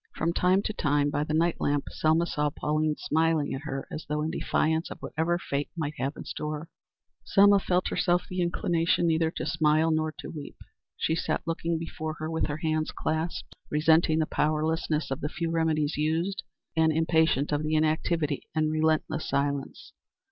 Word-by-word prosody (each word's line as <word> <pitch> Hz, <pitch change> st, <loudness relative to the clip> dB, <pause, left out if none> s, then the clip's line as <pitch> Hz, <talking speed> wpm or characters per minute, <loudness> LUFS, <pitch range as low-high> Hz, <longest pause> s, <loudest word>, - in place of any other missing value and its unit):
From 165 Hz, +2 st, 0 dB
time 185 Hz, +3 st, +3 dB
to 215 Hz, -, -2 dB
time, 145 Hz, -5 st, +1 dB
by 145 Hz, -, 0 dB
the 155 Hz, 0 st, -2 dB
night 170 Hz, +1 st, +1 dB
lamp, 145 Hz, 0 st, +1 dB
Selma 160 Hz, +2 st, +2 dB
saw 150 Hz, -3 st, 0 dB
Pauline 150 Hz, +1 st, 0 dB
smiling 160 Hz, -1 st, +1 dB
at 135 Hz, -, -4 dB
her 135 Hz, -2 st, -4 dB
as 155 Hz, -, -5 dB
though 150 Hz, 0 st, 0 dB
in 160 Hz, -, -1 dB
defiance 160 Hz, +1 st, 0 dB
of -, -, -7 dB
whatever 165 Hz, +2 st, -1 dB
fate 140 Hz, -4 st, -3 dB
might 155 Hz, -2 st, -2 dB
have 135 Hz, +2 st, -1 dB
in -, -, -6 dB
store. 150 Hz, +2 st, -5 dB, 0.5 s
Selma 200 Hz, 0 st, +5 dB
herself 185 Hz, -1 st, +1 dB
felt 175 Hz, 0 st, +1 dB
the 180 Hz, 0 st, -2 dB
inclination 170 Hz, 0 st, +1 dB
neither 160 Hz, -1 st, +2 dB
to -, -, -5 dB
smile 160 Hz, 0 st, +2 dB
nor 155 Hz, 0 st, +1 dB
to -, -, -7 dB
weep. 150 Hz, -3 st, -8 dB, 0.4 s
She 160 Hz, -, 0 dB
sat 165 Hz, -, -1 dB
looking 165 Hz, 0 st, -1 dB
before 160 Hz, -1 st, -5 dB
her 155 Hz, +1 st, -5 dB
with 160 Hz, -, 0 dB
her 150 Hz, -1 st, -3 dB
hands 155 Hz, 0 st, -1 dB
clasped, 160 Hz, +2 st, -3 dB
resenting 160 Hz, +1 st, +3 dB
the 160 Hz, -, +2 dB
powerlessness 155 Hz, 0 st, 0 dB
of 135 Hz, +4 st, -3 dB
the 150 Hz, -, -2 dB
few 165 Hz, +1 st, -3 dB
remedies 155 Hz, -3 st, +1 dB
used, 165 Hz, +5 st, 0 dB, 0.3 s
and 160 Hz, 0 st, +4 dB
impatient 160 Hz, -2 st, +2 dB
of 145 Hz, 0 st, +1 dB
the 155 Hz, 0 st, 0 dB
inactivity 155 Hz, -1 st, 0 dB
and 155 Hz, -1 st, +2 dB
relentless 155 Hz, 0 st, 0 dB
silence. 140 Hz, -1 st, -2 dB
155 Hz, 180 wpm, -28 LUFS, 150-165 Hz, 0.5 s, Selma